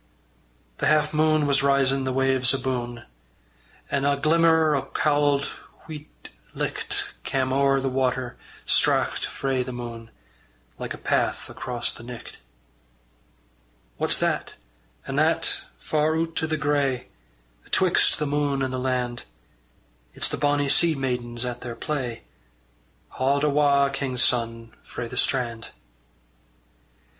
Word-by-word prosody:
The - - +1
half 155 0 +3
mune 155 0 +3
was 140 -1 +3
risin' 135 -1 +2
the 130 - 0
waves 130 0 +3
abune, 125 -3 -3 0.9
An' 140 - 0
a 140 0 +2
glimmer 160 0 +4
o' 140 - +1
cauld 145 -1 +1 0.3
weet 150 -1 -11 0.2
licht - - -1
Cam' 130 -1 -1
ower 135 0 +3
the 135 - -2
water 130 -1 -1 0.3
straucht - - +2
frae 135 -2 -1
the 125 +1 -4
mune, 120 -2 -7 0.7
Like - - -4
a - - -12
path - - -1
across 125 -2 -2
the - - -12
nicht. 120 0 -10 1.6
What's - - +2
that, - - -1 0.5
an' - - -4
that, - - +2
far 155 - 0
oot 165 0 -1
i' 160 - 0
the 155 0 -1
grey 140 -4 0 0.6
Atwixt - - +3
the 150 - -1
mune 145 -1 0
and 130 -1 -2
the 130 - -2
land? 125 -2 -2 0.9
It's - - -1
the - - -2
bonny 145 -1 +1
sea 165 +3 +5
maidens 125 -3 -2
at 125 0 -5
their 120 -1 -6
play 130 -6 -4 0.9
Haud 140 +2 0
awa', 140 -1 +3
king's 130 -3 +1
son, 115 -1 0
frae 120 - -6
the 125 - -8
strand. 120 -3 0
135 Hz, 130 wpm, -25 LUFS, 125-145 Hz, 1.6 s, sea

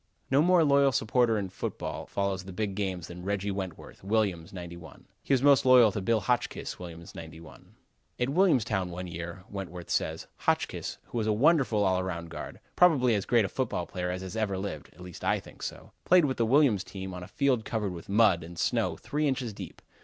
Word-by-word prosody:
No 135 +2 +5
more 175 0 +5
loyal 140 -2 +4
supporter 115 0 +2
of 95 -3 -4
football - - -5
follows 100 -1 -2
the 95 - -8
big 100 +2 -2
games 95 -4 -3
than 90 0 -9
Reggi 100 +1 -1
Wentworth, 95 -3 -7
Williams, 100 -4 0
'91. 85 -3 -10 0.2
He - - -6
is 130 -1 +3
most 140 -1 +6
loyal 125 -4 +7
to 100 - -3
Bill 110 +3 +1
Hotchkiss, 125 -1 -2
Williams 85 -1 -9
'91. 80 -5 -12 0.4
"At 125 +1 +1
Williamstown, 125 - +2
one 90 +1 -6
year," 85 +2 -7
Wentworth 90 -3 -7
says, - - -1
"Hotchkiss, - - -1
who 120 - -4
was 110 - -1
a - - +3
wonderful 130 -4 +3
all 95 -1 +2
round 85 -3 -5
guard, - - -7 0.2
probably 140 -9 +5
as 100 -3 0
great 120 -4 +4
a - - -1
football 110 -5 -2
player 90 0 -4
as 90 +2 -5
ever 105 -4 -1
lived 95 -7 -5
(at 85 - -17
least 90 -2 -10
I - - +2
think - - -15
so) - - -7
played 180 -3 +5
with 130 -2 -1
the 115 - +1
Williams 125 -7 +4
team 95 -1 -7
on 90 - -6
a 90 - -8
field 135 -6 +1
covered 105 -4 -2
with 85 +1 -10
mud 100 -5 +4
and 85 +1 -10
snow - - 0
three 150 +1 -1
inches 130 -5 -1
deep. - - -10
100 Hz, 205 wpm, -29 LUFS, 90-125 Hz, 0.4 s, loyal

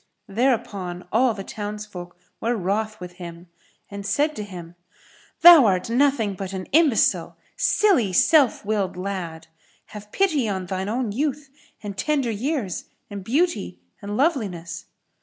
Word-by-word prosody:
Thereupon 200 -6 -1
all 230 +1 +3
the 195 - -6
townsfolk 205 -4 -7 0.2
were 235 +2 0
wroth 215 +2 -2
with 180 -1 -8
him 170 0 -9 0.4
and 200 0 -6
said 290 +10 0
to 210 - -4
him, 175 -4 -9 0.7
"Thou 335 -8 +10
art 185 +3 0
nothing 250 -5 +2
but 195 0 -6
an 185 -1 -4
imbecile, 300 -5 +3 0.2
silly, 350 - +2
self 270 - +4
willed 200 -3 -1
lad! 180 -4 -5 0.5
Have 210 0 -10
pity 310 - +1
on 190 -2 -3
shine 190 +1 -3
own 235 -1 -1
youth 280 +3 -2 0.3
and 205 -1 -5
tender 275 0 0
years 230 - -3 0.3
and 200 -1 -6
beauty 255 - 0 0.2
and 205 +1 -4
loveliness." 185 - -1
210 Hz, 140 wpm, -23 LUFS, 185-260 Hz, 0.7 s, Thou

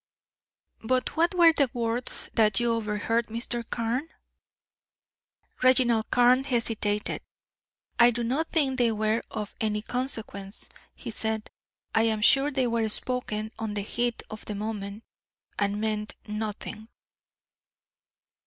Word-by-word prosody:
"But 255 +3 0
what 340 +3 +2
were 340 -2 +7
the 280 -5 +2
words 235 +1 -1
that 215 -3 +4
you 240 -1 +2
overheard, 225 +1 0
Mr. 235 +1 -3
Carne?" 240 +7 -1 1.5
Reginald 250 -3 +4
Carne 250 +1 +5
hesitated. 225 -5 0 0.8
"I 235 0 +8
do 240 0 -2
not 275 +8 0
think 270 -6 +1
they 235 -2 +4
were 215 +1 +1
of 210 -1 -5
any 210 -1 0
consequence" 220 -6 -3 0.3
he - - -6
said. 220 0 -2 0.4
"I 225 - +4
am 215 -1 -1
sure 270 +6 +6
they 265 -3 0
were 230 -2 0
spoken 220 -2 -1
on 220 -2 -3
the 205 - 0
heat 240 +3 -1
of 215 - -7
the 210 - -4
moment, 205 0 -5 0.6
and 205 0 0
meant 215 -1 -2
nothing." 215 +1 -5
225 Hz, 125 wpm, -27 LUFS, 215-250 Hz, 1.5 s, I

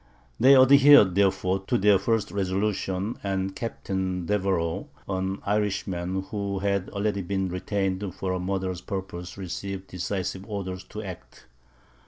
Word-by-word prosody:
They 135 +4 +7
adhered, 135 -5 +7
therefore, 95 -1 +2
to 120 - +2
their 105 -2 +5
first 110 +2 0
resolution, 100 +1 -1
and 95 -1 -2
Captain 95 -5 -3
Deveroux, 95 -4 0 0.2
an 95 0 -2
Irishman, 95 -3 -1
who 100 -1 -3
had 100 -1 -1
already 100 -1 -1
been 95 0 -2
retained 95 +1 -2
for 95 -1 -2
the 90 - -2
murderous 95 -1 -2
purpose, 90 -2 -6
received 95 +1 -5
decisive 95 +1 -3
orders 95 -2 -4
to 105 +1 -7
act. 90 -3 -10
95 Hz, 130 wpm, -26 LUFS, 95-100 Hz, 0.2 s, They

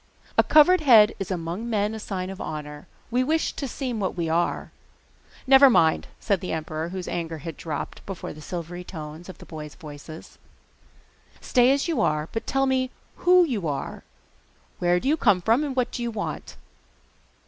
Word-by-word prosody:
'A - - +5
covered 315 +4 +6
head 230 -7 +7
is 195 - -4
among 180 +5 -4
men 210 -1 0
a 220 - -5
sign 190 -3 -4
of 195 - -8
honour. 150 -1 -6 0.2
We 250 +2 +2
wish 315 +4 0
to 275 - -4
seem 250 -2 -4
what 190 -2 -2
we 165 -2 -1
are.' 170 +2 0 0.7
'Never 270 +1 +8
mind,' 160 -9 +3
said 200 -5 0
the 180 - -4
emperor, 160 +1 -4
whose 185 0 -6
anger 165 -1 -3
had 160 +1 -7
dropped 150 -2 -6
before 195 -3 -6
the 155 - -12
silvery 175 +2 -6
tones 160 0 -9
of 185 - -9
the - - -13
boy's 150 -2 -8
voice. 155 0 -11 1.0
'Stay 250 0 +3
as 280 +3 +1
you 330 - 0
are, 150 0 0
but 225 - -4
tell 270 +1 +1
me 260 -1 +1 0.3
WHO 360 0 +5
you 220 - -2
are! 140 -2 -4 0.8
Where 175 0 +2
do 260 - -4
you 305 +3 +3
come 205 - +4
from, 230 - +2
and 280 -3 -3
what 250 -2 0
do - - -5
you 235 - -1
want? 220 -2 -5
190 Hz, 185 wpm, -25 LUFS, 165-255 Hz, 1.0 s, Never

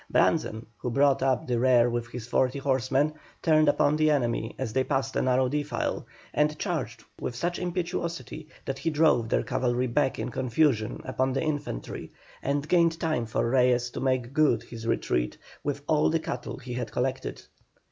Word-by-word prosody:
Brandzen, 110 +1 +2
who 125 - -3
brought 140 +2 +3
up 130 -1 +1
the 120 -2 0
rear 125 -1 +5
with 120 -1 -2
his 120 -1 -7
forty 130 +2 +1
horsemen, 135 +2 +1 0.3
turned 155 -2 +5
upon 145 +1 +3
the 155 0 +3
enemy 120 -6 0
as 125 -5 -3
they 130 +1 +2
passed 135 -1 -1
a - - +2
narrow 130 0 +3
defile, 145 +3 -2 0.3
and 150 +1 +2
charged - - -3 0.2
with 120 - -4
such 175 +7 -2
impetuosity 170 -3 -3 0.2
that 135 0 -3
he 165 - 0
drove 150 -7 +3
their - - +2
cavalry 125 0 0
back 135 +2 +1
in - - -3
confusion 125 -3 +1
upon 130 0 0
the 135 - 0
infantry, 145 - -4 0.3
and 140 +1 -1
gained 165 -1 +3
time 155 -8 0
for 110 - 0
Reyes 125 -1 +3
to - - -5
make 130 -1 0
good 150 -5 +3
his 115 -1 -8
retreat 60 - 0 0.3
with 145 0 -3
all 155 -1 +3
the 165 - +1
cattle 125 -5 -5
he 130 -2 -7
had 120 -1 -4
collected. 130 +1 -2
130 Hz, 180 wpm, -27 LUFS, 120-150 Hz, 0.3 s, rear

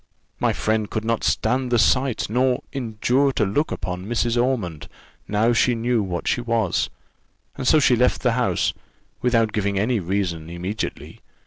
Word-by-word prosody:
My - - +2
friend 110 -1 -1
could 110 0 -3
not 115 0 0
stand 125 +3 +1
the 120 - +4
sight, 130 +1 +2
nor 125 +3 +1
endure 130 +2 +1
to 105 - +1
look 145 +11 0
upon 90 +1 -4
Mrs. 120 0 0
Ormond 120 - -1 0.4
now 110 +3 +2
she 120 +1 +3
knew 115 0 +1
what 90 -3 -4
she 120 - +1
was; 115 -6 0 0.7
and 130 -2 -4
so 155 - +6
she 130 -3 +4
left 125 +2 +1
the 125 - +3
house, 115 -7 +1 0.5
without 115 -3 +2
giving 100 -1 0
any 110 +4 +1
reason, 90 -3 -2
immediately. 90 +5 -5
115 Hz, 160 wpm, -22 LUFS, 100-125 Hz, 0.7 s, so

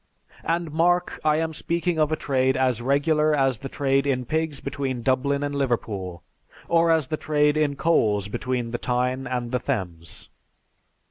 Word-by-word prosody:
And 165 -1 -1
mark, 175 +3 +1
I 155 -1 +3
am 160 0 -1
speaking 170 +1 -1
of 155 0 +2
a - - +2
trade 130 -3 +1
as 130 -3 +1
regular 150 +4 +2
as 135 -4 +1
the 135 0 -6
trade 135 0 +1
in 130 -2 0
pigs 160 0 -1
between 135 -3 -4
Dublin 140 +2 +1
and 145 0 -2
Liverpool, 105 -10 -2 0.4
or 170 0 +3
as 160 -5 +2
the 155 - -1
trade 150 -1 +2
in 150 -2 +1
coals 105 - +2
between 125 +2 -3
the 120 - -3
Tyne 125 +1 -1
and 125 -2 -3
the 125 - 0
Thames." 85 -7 -5
140 Hz, 165 wpm, -24 LUFS, 125-155 Hz, 0.4 s, I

